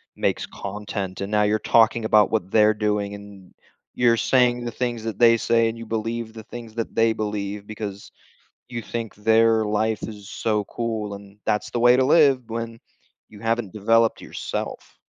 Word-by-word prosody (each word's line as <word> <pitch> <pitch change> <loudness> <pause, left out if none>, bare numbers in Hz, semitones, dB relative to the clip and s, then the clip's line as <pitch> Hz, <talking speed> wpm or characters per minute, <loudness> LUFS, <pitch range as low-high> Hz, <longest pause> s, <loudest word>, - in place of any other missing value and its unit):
makes - - -1
content, 100 -1 -6
and 100 +2 -4
now 105 0 +3
you're 105 +1 +2
talking 115 0 +3
about 105 -1 +4
what 105 -4 -1
they're 110 0 +5
doing, 105 -1 -1
and 100 -2 -13 0.4
you're 120 -1 +3
saying 125 -1 +2
the 120 - -4
things 120 -2 -3
that 115 +1 -5
they 115 -1 +7
say, 115 0 +2
and 115 - -6
you 115 - -8
believe 115 +1 -3
the 110 -1 -9
things 115 -1 -10
that 115 -1 -4
they 115 0 +4
believe, 105 -1 -4
because 105 -2 -7 0.6
you 120 -1 -4
think 115 -2 -5
their 110 +1 +3
life 105 0 0
is 105 -2 -10
so 105 -2 -1
cool, 110 -3 -4
and 100 0 -14
that's 105 - -1
the 120 - -1
way 120 +1 +6
to 130 - +3
live 140 -4 +5
when 115 0 -5 0.5
you 105 - -14
haven't 115 -3 -1
developed 115 +2 +2
yourself. - - -6
110 Hz, 180 wpm, -23 LUFS, 105-115 Hz, 0.6 s, they